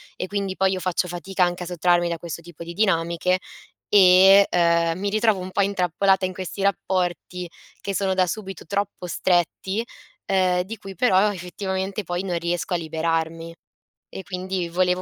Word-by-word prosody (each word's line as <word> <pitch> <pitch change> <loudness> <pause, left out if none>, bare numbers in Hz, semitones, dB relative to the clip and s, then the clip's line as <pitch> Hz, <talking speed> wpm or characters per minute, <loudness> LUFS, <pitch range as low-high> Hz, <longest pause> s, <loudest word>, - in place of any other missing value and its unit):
e 185 - -4
quindi 200 -1 -3
poi 190 0 +2
io 185 - -2
faccio 180 0 -1
fatica 180 +2 -1
anche 175 0 -1
a - - -6
sottrarmi 175 0 +2
da 170 -1 -2
questo 170 -1 -6
tipo 170 -1 -10
di 170 - -7
dinamiche 180 -2 +1 0.5
e, 195 0 +7
uhm, 170 -1 +2
mi 200 0 -1
ritrovo 215 -2 +2
un 185 +1 -7
po' 200 - +1
intrappolata 190 0 +1
in 185 - -2
questi 185 +1 -6
rapporti 180 -2 -1 0.3
che 200 - -3
sono 195 -1 +1
da 185 -1 +3
subito 195 -3 -6
troppo 200 0 -3
stretti, 185 +4 0 0.4
uhm, 185 -2 +2
di 210 +5 -7
cui 195 -2 -10
però 205 -1 +3
effettivamente 190 +2 -4
poi 175 +2 -3
non 180 -3 -2
riesco 175 +1 -2
a - - +2
liberarmi. 165 0 -2 0.6
E 190 - -8
quindi 185 -1 -4
volevo 180 +1 +1
185 Hz, 170 wpm, -23 LUFS, 175-195 Hz, 0.6 s, e